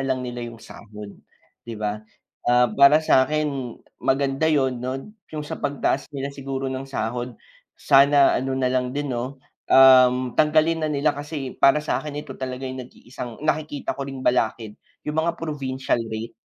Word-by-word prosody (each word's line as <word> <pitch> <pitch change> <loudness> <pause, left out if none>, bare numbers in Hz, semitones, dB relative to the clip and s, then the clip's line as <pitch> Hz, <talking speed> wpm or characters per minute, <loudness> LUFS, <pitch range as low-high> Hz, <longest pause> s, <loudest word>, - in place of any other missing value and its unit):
lang 130 -1 -1
nila 120 0 -5
yung 115 - -11
sahod, 105 -2 -11 0.5
'di 115 -1 -8
ba? 105 0 -3 0.5
Ah, 125 0 +4
para 140 +6 +6
sa 130 -3 +4
'kin 145 -5 -2 0.2
maganda 135 +3 +1
yun 130 -5 +1
'no, 135 +10 -5 0.2
yung 150 -1 -6
sa - - -7
pagtaas 140 -1 -1
nila 140 0 -4
siguro 135 -1 -4
ng 135 +1 -6
sahod, 120 -1 -4 0.4
sana 140 0 +5
ano 130 +1 -2
na 130 -1 0
lang 125 +1 -1
din 145 -2 -2
'no, 130 +3 -5 0.3
um, 130 -1 +6
tanggalin 155 +1 +3
na - - 0
nila 150 0 +1
kasi 145 -2 -6
para 140 +2 +5
sa - - 0
'kin 150 -1 -7
ito - - -8
talaga 130 0 -4
yung 130 0 -5
nag-iisang 125 +2 -10
nakikita 150 -1 -1
ko 140 - -5
ring 135 -1 -7
balakid 115 -3 0 0.3
yung 150 +1 0
mga 170 +1 -1
provincial 135 -6 -2
rate. 110 +1 -5
135 Hz, 170 wpm, -23 LUFS, 125-145 Hz, 0.5 s, para